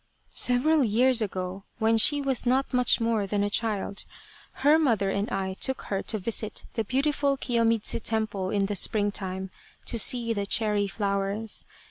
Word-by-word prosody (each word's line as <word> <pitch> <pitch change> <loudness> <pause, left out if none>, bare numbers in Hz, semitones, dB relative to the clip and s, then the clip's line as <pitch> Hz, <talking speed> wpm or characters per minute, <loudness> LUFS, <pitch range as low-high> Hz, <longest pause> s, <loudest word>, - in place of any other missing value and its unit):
" - - -39 0.2
Several 290 +5 +3
years 245 +2 +3
ago, 190 -2 -4
when 225 +1 +2
she 285 +6 +5
was 270 -3 +1
not 260 +2 +1
much 250 0 +3
more 230 -3 0
than 205 +1 0
a 205 - -1
child, 205 -3 -2 0.6
her 305 +2 +6
mother 220 -10 +1
and 200 +2 -2
I 190 -1 -2
took 265 +7 -2
her 195 - 0
to 220 - -1
visit 215 +1 -3
the 225 - -1
beautiful 280 +3 0
Kiyomidzu 230 -4 +1
Temple 215 -4 -2
in 200 0 0
the 205 +1 -3
springtime 190 -2 -1 0.3
to 235 - -2
see 230 +1 +2
the 200 -2 -3
cherry 210 -2 +1
flowers. 200 +1 -2
220 Hz, 165 wpm, -26 LUFS, 200-245 Hz, 0.6 s, her